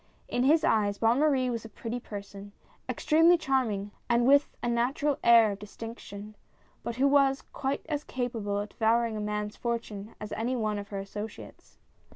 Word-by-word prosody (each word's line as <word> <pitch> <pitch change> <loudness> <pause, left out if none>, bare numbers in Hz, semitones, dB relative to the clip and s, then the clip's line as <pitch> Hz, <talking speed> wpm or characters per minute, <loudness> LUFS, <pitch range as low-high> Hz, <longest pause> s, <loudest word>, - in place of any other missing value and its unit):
In 245 - -1
his 310 +3 +4
eyes 205 -6 +2
Bonne 230 +4 +3
Marie 270 -4 +2
was 230 -2 -3
a 225 - -9
pretty 230 +3 -5
person 200 -2 -9 0.2
— - - -33
extremely 330 +3 +4
charm 265 -6 +1
ing, 200 0 -4 0.2
and 235 0 +3
with 280 +2 +4
a - - 0
natural 260 +5 0
air 230 -2 +7
of 200 - -6
distinction, 210 -1 -9 0.5
but 235 - -4
who 270 +3 +3
was 275 -1 +3
quite 275 0 -4
as 300 -2 -2
capable 230 -7 -3
of 205 +1 -3
devouring 230 +1 +1
a - - -3
man's 210 0 -3
fortune 230 -3 -4
as 210 - -7
any 235 +4 -1
one 215 -3 -1
of 200 - -7
her 200 - -6
associates. 205 +2 -8
230 Hz, 185 wpm, -29 LUFS, 210-265 Hz, 0.5 s, air